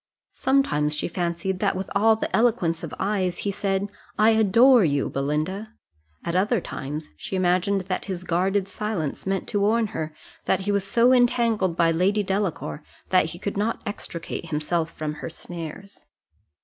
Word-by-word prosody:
Sometimes 150 - +1
she 150 - -2
fancied, 175 +2 -2
that - - +1
with 190 +1 -3
all 220 +2 +5
the 220 - -2
eloquence 215 -9 +2
of 165 - -6
eyes 190 -3 0
he 200 - +1
said, 195 0 -1 0.3
"I 215 +1 +5
adore 225 +3 +6
you, 145 -4 +1
Belinda;" 155 +11 -2 0.5
at 170 - -2
other 210 +5 +2
times 150 -1 -6
she 190 - -5
imagined 185 +2 +2
that 185 0 -3
his 185 -3 -4
guarded 190 +3 +1
silence 195 -7 -3
meant 195 -1 -1
to 205 - 0
warn 220 +3 +3
her 155 0 -3 0.3
that - - +2
he 205 +2 -1
was 200 -1 +1
so 240 +5 +4
entangled 230 -7 +2
by 165 -1 +4
Lady 195 +5 +2
Delacour, 190 -5 -2 0.3
that 185 -3 +4
he 165 +2 -6
could 200 +2 -4
not 215 +3 -1
extricate 170 -5 -5
himself 160 +2 -1
from 155 -2 -4
her - - -4
snares. 170 +3 -8
190 Hz, 165 wpm, -24 LUFS, 170-210 Hz, 0.5 s, adore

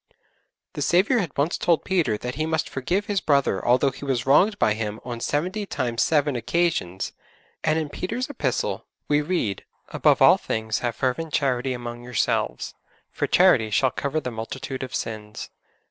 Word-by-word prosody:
The - - -5
Saviour 200 +8 +3
had 175 -9 -4
once 145 +5 0
told 170 -2 +2
Peter 175 - +1
that 125 +3 -5
he 155 +4 -2
must 160 -1 0
forgive 175 +10 -1
his 205 -2 0
brother 140 -9 +2
although 130 +3 +3
he 135 - -11
was 130 -3 -1
wronged 190 +10 +4
by 105 - +3
him 110 0 -4
on 120 -2 -5
seventy 185 - -2
times 120 -7 -1
seven 150 -3 +2
occasions, 120 - -1 0.5
and 155 - +2
in 160 -2 -1
Peter's 230 - -3
Epistle 130 - -2 0.2
we 150 0 +3
read, 145 - -1 0.3
'Above - - +3
all - - +7
things 110 -1 -2
have 120 -2 -2
fervent 150 +5 -1
charity 130 -1 +1
among 120 -1 -6
yourselves: 120 - -1 0.4
for - - -2
charity 110 -1 +4
shall 130 +4 +2
cover 140 +3 -2
the 125 - -5
multitude 130 +4 -5
of 130 -2 -5
sins.' 105 -1 -5
135 Hz, 170 wpm, -24 LUFS, 120-160 Hz, 0.5 s, all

